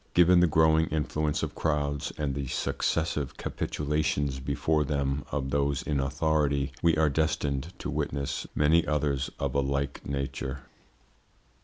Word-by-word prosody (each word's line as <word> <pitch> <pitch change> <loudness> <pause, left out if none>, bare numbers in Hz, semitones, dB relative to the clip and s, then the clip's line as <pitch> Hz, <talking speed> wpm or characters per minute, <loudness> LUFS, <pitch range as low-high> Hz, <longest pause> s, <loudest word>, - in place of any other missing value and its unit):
Given 90 +1 +6
the 90 - +5
growing 80 0 +4
influence 75 0 -1
of - - -3
crowds 75 -2 -1
and 75 -3 -1
the 70 -1 -3
successive 75 +2 -1
capitulations 75 -2 -1
before 75 +3 0
them 70 -1 -1
of 65 -2 -2
those 70 +1 +1
in 75 -3 -1
authority, 70 0 +1
we 85 -2 +3
are 80 0 +4
destined 75 0 0
to - - -4
witness 70 0 -2
many 80 +3 +4
others 70 -3 0
of - - -2
a 70 - +2
like 70 +1 -2
nature. 70 -1 -4
75 Hz, 140 wpm, -28 LUFS, 70-80 Hz, -, Given